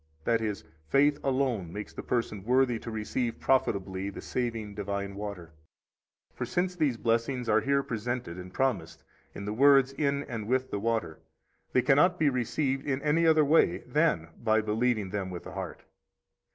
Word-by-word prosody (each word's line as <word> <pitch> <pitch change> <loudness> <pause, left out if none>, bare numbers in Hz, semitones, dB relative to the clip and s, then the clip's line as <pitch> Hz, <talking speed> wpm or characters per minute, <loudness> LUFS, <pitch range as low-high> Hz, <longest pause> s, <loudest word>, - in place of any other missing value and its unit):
That 115 +3 +2
is, 105 -5 -3 0.3
faith 145 +1 +4
alone 130 -10 0
makes 105 +3 -7
the - - -6
person 110 -5 -2
worthy 125 0 +2
to 115 - -7
receive 115 +2 -2
profitably 100 -7 0
the 100 - -8
saving, 115 -4 -3
divine 100 -1 -3
water. 100 -5 -7 0.8
For, - - -4
since 180 +1 -1
these 145 -8 +1
blessings 115 +2 0
are - - +4
here 140 0 +1
presented 115 -6 -4
and 90 0 -9
promised 130 +2 -1 0.3
in 100 - -6
the 105 - -2
words 135 +2 +5
in 140 0 0
and 115 -6 -6
with 130 +2 0
the 100 - -2
water, 110 -7 -1 0.5
they 125 - +3
cannot 150 +7 +4
be 155 -4 +3
received 135 +2 -1
in 135 -1 0
any 160 +3 +3
other 155 -2 +5
way 155 +3 +3
than 150 - +1
by 110 -1 +3
believing 110 -2 0
them 95 -2 -3
with 90 -1 -7
the - - -9
heart. - - -6
120 Hz, 170 wpm, -29 LUFS, 105-135 Hz, 0.8 s, words